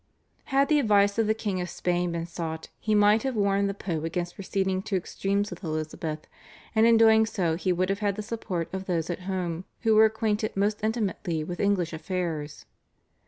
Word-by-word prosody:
Had 275 0 +2
the 300 -1 +4
advice 205 -3 +3
of 225 - +2
the 220 - +2
King 200 -4 -2
of 175 - -4
Spain 175 0 -1
been 165 0 -2
sought 165 -2 -5
he 215 -1 +1
might 210 +1 +5
have 265 -2 -2
warned 200 -1 +2
the 200 - -3
Pope 165 -6 -3
against 175 +2 -3
proceeding 190 -1 -1
to 200 0 -3
extremes 200 +2 -1
with 175 +2 -9
Elizabeth, 155 -1 -4 0.5
and 220 0 +5
in 230 -1 +6
doing 220 -1 +6
so 175 -7 0
he 185 +2 0
would 185 +1 0
have 195 +1 0
had 205 -2 0
the 210 - -4
support 205 -6 -3
of 190 0 -4
those 170 -2 -1
at 175 - -4
home 180 -2 -2 0.2
who 225 -2 +3
were 215 +1 +7
acquainted 220 -1 -1
most 205 +1 0
intimately 195 -7 -1
with 175 +3 -6
English 190 -5 +1
affairs. 160 -3 -4
195 Hz, 200 wpm, -27 LUFS, 175-215 Hz, 0.5 s, were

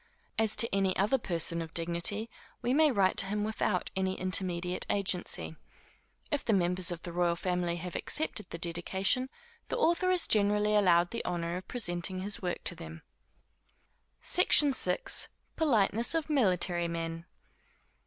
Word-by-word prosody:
As 220 -1 +2
to 230 - +3
any 195 -1 0
other 215 +7 +1
person 170 -4 0
of 165 0 -9
dignity, 170 +6 0 0.4
we 245 +1 0
may 310 +2 +4
write 195 -5 +1
to 195 - +3
him 210 +1 -2
without 215 -3 -2
any 190 0 -2
intermediate 180 -1 -1
agency. 185 -4 -2 0.8
If 290 - -1
the 225 - 0
members 180 -1 +1
of 170 -1 -7
the 175 - -7
royal 175 -1 +1
family 180 -1 -2
have 175 +1 -7
accepted 300 -8 0
the - - -6
dedication, 190 +9 +1 0.4
the - - -3
author 345 +2 +1
is 365 -2 +2
generally 210 0 +2
allowed 175 -4 +3
the 235 - -4
honor 170 -1 -3
of 185 0 -7
presenting 185 -5 -1
his 200 +1 -4
work 180 -2 -4
to - - +2
them. 165 -1 -11 1.2
SECTION 295 -5 +5
VI. 380 - +1 0.5
_Politeness 235 -4 +2
of 315 -1 -4
Military 180 - +2
Men. 165 0 -5
185 Hz, 155 wpm, -30 LUFS, 175-220 Hz, 1.2 s, SECTION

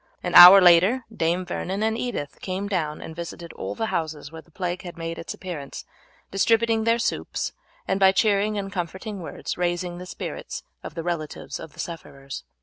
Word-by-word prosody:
An 175 - -3
hour 180 +3 +12
later 185 +8 +5
Dame 170 +2 0
Vernon 195 +4 -3
and 220 0 +1
Edith 230 - -4
came 190 +2 -3
down 160 -6 -2
and 160 - -8
visited 170 0 -7
all - - -5
the 225 - -2
houses 155 -3 -3
where 160 0 -9
the 170 - -27
plague 180 +1 -4
had 175 -2 -9
made 165 0 -5
its - - -6
appearance, 165 -7 -7 0.5
distributing 225 +2 +2
their 230 0 +3
soups, 235 - -2 0.3
and 190 - 0
by 190 -1 +6
cheering 205 +1 +2
and 195 -1 -4
comforting 190 +3 -5
words 170 - -6
raising 175 0 -1
the 180 - -8
spirits - - -6 0.2
of - - -9
the 165 - -4
relatives 165 -3 -4
of 155 - -10
the - - -18
sufferers. 140 -5 -7
180 Hz, 185 wpm, -24 LUFS, 165-200 Hz, 0.5 s, hour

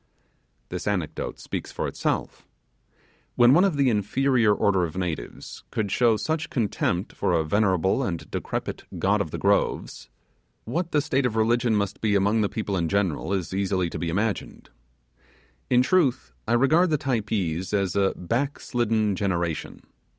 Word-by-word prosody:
This - - -5
anecdote 95 -7 -2
speaks - - -5
for - - -3
itself. - - -3 0.9
When 120 +1 +6
one 175 +5 +6
of 190 -7 +1
the 135 -3 +3
inferior 115 +2 +2
order 95 -2 +2
of 80 0 -4
natives 85 -9 -5
could 105 -3 -2
show 115 -1 +3
such 160 +6 -2
contempt 100 -5 -1
for - - 0
a 80 -2 +2
venerable 95 +4 +2
and 90 -10 -3
decrepit - - -4 0.2
God - - +2
of - - -3
the - - -5
Groves, - - 0 0.6
what 170 +9 -2
the 150 - +3
state 135 -2 +1
of 110 - -5
religion 115 +1 +2
must 100 -1 -2
be 105 -2 +2
among 100 +3 +2
the 100 - +1
people 105 -3 -3
in 85 -3 0
general 95 -4 0
is 95 -2 -2
easy 95 -3 0
to - - -5
be 85 - -2
imagined. 105 +5 -3 1.0
In 125 0 +4
truth, 130 - +1
I 115 - +1
regard 155 +9 +4
the 155 - +2
Typees 100 - -2
as 100 -3 0
a 100 -1 +2
back 125 +11 -2
slidden 110 -4 0
generation. 85 -4 -2
105 Hz, 160 wpm, -25 LUFS, 95-125 Hz, 1.0 s, When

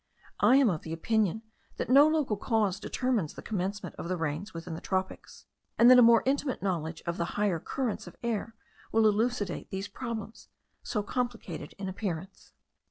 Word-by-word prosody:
I 255 - +6
am 275 -2 +6
of 165 -6 -2
opinion 215 +5 0 0.3
that - - -2
no 280 +4 +7
local 305 -8 +1
cause 205 -3 0
determines 230 - -1
the - - -9
commencement 200 0 -3
of 170 - -5
the 185 - -1
rains 160 +5 -3
within 165 0 -7
the 160 - -6
tropics; 190 0 -4 0.3
and 240 +2 +8
that 250 - +9
a - - +9
more 230 -1 +6
intimate 270 -2 0
knowledge 165 -4 -2
of 170 0 -2
the 170 - 0
higher 205 -5 +1
currents 240 +1 -3
of 175 - -11
air 230 -1 -2 0.4
will 220 0 +4
elucidate 215 -3 0
these 195 +1 -4
problems, 230 -3 -6 0.3
so 210 -3 -2
complicated 210 - -4
in 200 -1 -5
appearance. 190 -1 -5
205 Hz, 170 wpm, -29 LUFS, 180-235 Hz, 0.4 s, that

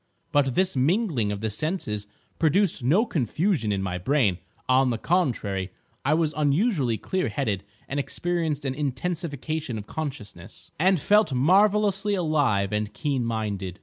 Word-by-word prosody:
But 135 -3 +2
this 185 -2 +1
mingling 140 - +1
of 100 0 -4
the 110 -1 -2
senses 105 - -3 0.3
produced 165 -2 +2
no 175 - +3
confusion 150 - 0
in 100 -1 -1
my 90 -1 -3
brain. 105 - +1 0.3
On 130 0 +4
the 120 - -1
contrary, 110 - 0 0.3
I 145 +3 +3
was 160 -2 +1
unusually 145 - +1
clear 185 - -2
headed 105 - -2 0.2
and 145 - -2
experienced 160 -1 -2
an 130 - -1
intensification 150 -1 -3
of 105 - -7
consciousness, 110 - -7
and 185 +1 +4
felt 205 0 +3
marvellously 200 +7 +3
alive 145 - +1
and 105 0 -1
keen 140 -5 -1
minded. 105 -5 -3
145 Hz, 145 wpm, -25 LUFS, 110-175 Hz, 0.3 s, On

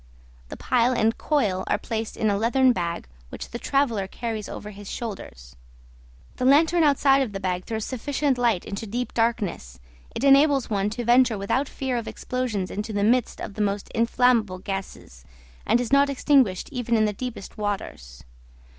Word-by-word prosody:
The - - -8
pile 250 0 +2
and 225 -1 +2
coil 205 -12 0
are - - +1
placed 220 +1 -4
in 215 -1 +1
a - - +1
leathern 250 +5 +3
bag 170 - -3 0.2
which - - -8
the 235 - -5
traveller 240 -10 0
carries 220 0 -5
over 210 - -7
his 205 -1 -10
shoulders; 65 - -7 0.8
the - - -3
lantern 320 +6 +4
outside 275 -2 +4
of 235 -6 -2
the 195 - -4
bag 185 -1 -2
throws 220 -1 -3
sufficient 270 +1 -1
light 230 -7 +1
into 205 +2 -5
deep 245 +4 -3
darkness; 210 - -1 0.4
it - - -3
enables 275 -2 +4
one 200 0 +1
to 235 +3 -5
venture 240 -1 +4
without 260 +8 -1
fear 260 -2 -3
of 230 - -4
explosions 240 -7 -3
into 210 +2 -4
the 205 -1 -1
midst 240 +3 +1
of - - -6
the 215 - -4
most 200 -1 -1
inflammable 230 -4 +2
gases, 190 - -7 0.4
and 240 - +3
is 245 +1 -3
not 280 0 +5
extinguished 265 -8 +2
even 245 -3 0
in 215 - +3
the 210 - -1
deepest 240 -1 -7
waters. 190 - -5
225 Hz, 175 wpm, -24 LUFS, 200-255 Hz, 0.8 s, not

